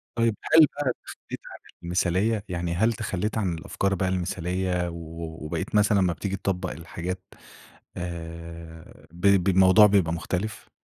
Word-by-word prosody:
طيب، 115 -2 +2 0.2
هل 160 - +10
بقى 145 -3 -2
تخلِّيت - - -9
عن - - -10 0.2
المثالية؟ 95 +5 +1
يعني 85 -1 -2
هل 110 +6 +3
تخلّيت 105 -1 -2
عن 95 -5 0
الأفكار 100 +5 -1
بقى 95 0 0
المثالية 90 0 -1
و 85 - -8 0.5
وبقيت 75 - -4
مثلًا 105 -1 +4
أمّا 90 -2 +3
بتيجي 100 +3 -3
تطبّق 95 -1 -2
الحاجات، 90 +3 -5 0.7
آآ 85 -1 -8
ب 85 - -14 0.2
بالموضوع 95 +2 +7
بيبقى 95 -5 +3
مختلف؟ 100 +5 -4
95 Hz, 140 wpm, -26 LUFS, 85-100 Hz, 0.7 s, هل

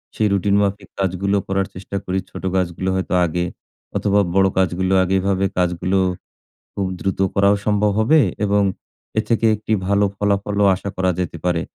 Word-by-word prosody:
সেই 110 - +2
রুটিন 100 +1 +2
মাফিক 100 -1 -2
কাজগুলো 95 +1 0
করার 95 0 0
চেষ্টা 95 +2 -5
করি, 95 +1 -1
ছোটো 95 - -5
কাজগুলো 95 0 -1
হয়তো 95 0 -2
আগে 90 +1 -1 0.5
অথবা 100 0 +2
বড়ো 95 0 +4
কাজগুলো 95 0 +1
আগে 95 +1 0
এভাবে 95 0 +1
কাজগুলো 90 +1 0 0.8
খুব 100 - -2
দ্রুত 95 -1 -2 0.2
করাও 100 +1 +4
সম্ভব 105 0 +2
হবে 150 +9 +4 0.3
এবং 100 0 +2 0.5
এর 110 - +3
থেকে 115 -1 +2
একটি 105 +1 -7 0.2
ভালো 100 +1 +3
ফলাফলও 100 0 +1
আশা 100 +2 -6
করা 95 0 +1
যেতে 85 -2 -3
পারে। 85 -2 +1
95 Hz, 165 wpm, -20 LUFS, 95-100 Hz, 0.8 s, বড়ো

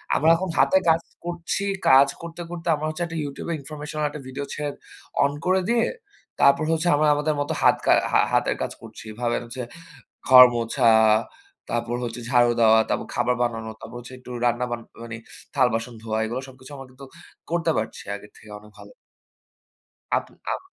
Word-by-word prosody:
আমরা 155 - +3
এখন 185 +2 -3
হাতে 190 - +5
কাজ 165 +1 +4 0.2
করছি। 175 +2 -3 0.3
কাজ 135 +1 +7
করতে, 170 +1 -8
করতে 175 -1 -7
আমার 150 +1 -4
হচ্ছে 165 +3 -3
একটা 165 0 -6
YouTube 140 +3 -6
এ - - 0
ইনফরমেশনাল 150 +1 -6
একটা 145 -1 -8
ভিডিও 135 +2 -5
ছেড়ে 145 0 -3 0.5
অন 140 - +2
করে 185 +1 +3
দিয়ে 235 -1 +3 0.6
তারপর 140 +2 +5
হচ্ছে 165 +2 0
আমরা 150 +1 +2
আমাদের 150 +1 0
মতো 145 - -2
হাত - - +6
কা - - +4 0.2
হা - - +4
হাতের - - +2
কাজ - - -2
করছি। - - -11
এভাবে 120 +1 -1
হচ্ছে 120 +2 -7 0.7
ঘর 125 -1 +10
মোছা, 120 +2 +1 0.8
তারপর 120 0 -2
হচ্ছে 120 0 -5
ঝাড়ু 120 -1 +4
দেওয়া, 110 -1 +6
তারপর - - -2
খাবার 125 +1 +1
বানানো, 115 -2 -3
তারপর - - -10
হচ্ছে 120 +1 -11
একটু 125 - -14 0.2
রান্না 120 +1 +1
বান 120 -1 -3 0.2
মানি 115 0 -7 0.4
থাল 130 -3 +4
বাসন 115 +2 -3
ধোয়া 110 -1 -3
এগুলা 120 +4 -4
সবকিছু 130 +2 -14
আমরা 135 -1 -10
কিন্তু 135 +2 -13 0.4
করতে 170 -1 +1
পারছি 110 +1 -4
আগের 105 +1 -12
থেকে 110 - -16
অনেক 105 0 -17
ভালো। - - -13 1.3
আপ - - -1 0.3
আম - - -4
130 Hz, 180 wpm, -24 LUFS, 120-155 Hz, 1.3 s, ঘর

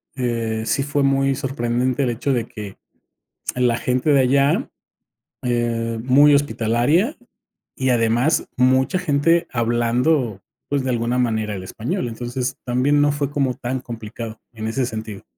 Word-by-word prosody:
eh, 115 -3 -1
sí 140 - +1
fue 145 0 0
muy 135 0 +2
sorprendente 130 -1 -1
el 125 - +1
hecho 125 +4 -1
de 120 -3 0
que, 105 -2 -9 0.8
la 125 -2 +2
gente 125 +5 0
de 140 -2 +5
allá, 140 - +2 0.7
eh, 120 -2 -1
muy 140 +4 +6
hospitalaria 145 - +1 0.6
y 130 0 0
además 120 +5 +2
mucha 130 +7 +3
gente 165 0 +2
hablando, 120 0 +1 0.3
pues, 140 -2 0
de 130 - -1
alguna 120 +1 0
manera 110 -3 0
el 95 -2 -6
español. 115 +5 -3
Entonces, 125 +3 -4
también 130 +4 +2
no 145 0 +3
fue 145 -1 -2
como 135 -3 0
tan 130 +1 -3
complicado, 115 -1 -7
en 110 -1 -4
ese 125 +2 -1
sentido. 110 -3 -6
125 Hz, 145 wpm, -21 LUFS, 115-140 Hz, 0.8 s, muy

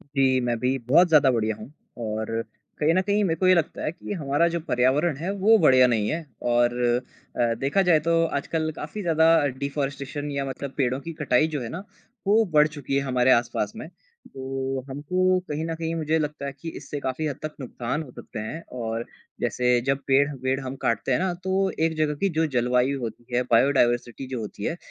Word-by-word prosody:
जी, 130 -1 +3
मैं 120 -1 0
भी 130 +1 +1
बहुत 175 +7 +6
ज़्यादा 150 -4 +5
बढ़ियाँ 110 -3 0
हूँ, 110 +5 -11 0.3
और 110 0 -3 0.4
कहीं 155 +2 +3
न 185 - +3
कहीं, 205 +1 +1
मेरे 165 -4 +1
को 185 - +3
ये 185 - +7
लगता 170 -3 -1
है 155 - -1
कि 175 - -7
हमारा 145 +3 +2
जो 170 0 -2
पर्यावरण 140 +2 +1
है, 170 +5 -3
वो 205 +3 +4
बढ़िया 130 -8 +6
नहीं 110 -4 +1
है 160 0 -3 0.3
और 120 0 +3 0.7
अ, 120 -1 +3
देखा 140 +8 +2
जाए, 175 -4 +4
तो 165 +1 +2
आजकल 160 +1 -2
काफ़ी 160 +8 -6
ज़्यादा 160 -2 +3 0.3
डिफ़ॉरेस्टेशन 140 +1 -3
या 140 -1 -2
मतलब 135 +1 -5
पेड़ों 130 -1 +1
की 165 +3 -7
कटाई 140 +1 +3
जो 150 -4 -4
है 115 - -5
ना, 180 - -6 0.4
वो 215 +3 +5
बढ़ 150 0 +6
चुकी 145 -3 -4
है 140 - +2
हमारे 130 -1 +2
आस 120 -1 +3
पास 105 - -1
में। - - -7 0.5
तो 135 0 -3
हमको 185 +7 +1
कहीं 150 +2 -2
न 165 0 -3
कहीं, 165 0 -3
मुझे 160 0 0
लगता 150 -2 -3
है 140 - -3
कि 165 - -4
इससे 145 0 -6
काफ़ी 140 +3 -2
हद 145 - -3
तक 155 0 -5
नुकसान 130 +3 -4
हो 135 - -13
सकते - - -9
हैं 130 +10 -5 0.2
और 115 +1 -3 0.4
जैसे, 125 0 +2
जब 135 +2 0
पेड़-वेड़ 135 -1 +1
हम 130 +1 -4
काटते 115 +3 0
हैं 125 - +3
ना, 185 0 0
तो 190 +2 0
एक 160 0 +1
जगह 155 -1 +1
की 195 - +3
जो 160 - +3
जलवायु 125 +3 +2
होती 120 0 -6
है, 125 - +3
बायोडाइवर्सिटी 120 0 +2
जो 130 -2 -4
होती 105 -2 -7
है, 165 - -2
140 Hz, 210 wpm, -25 LUFS, 125-160 Hz, 0.7 s, ये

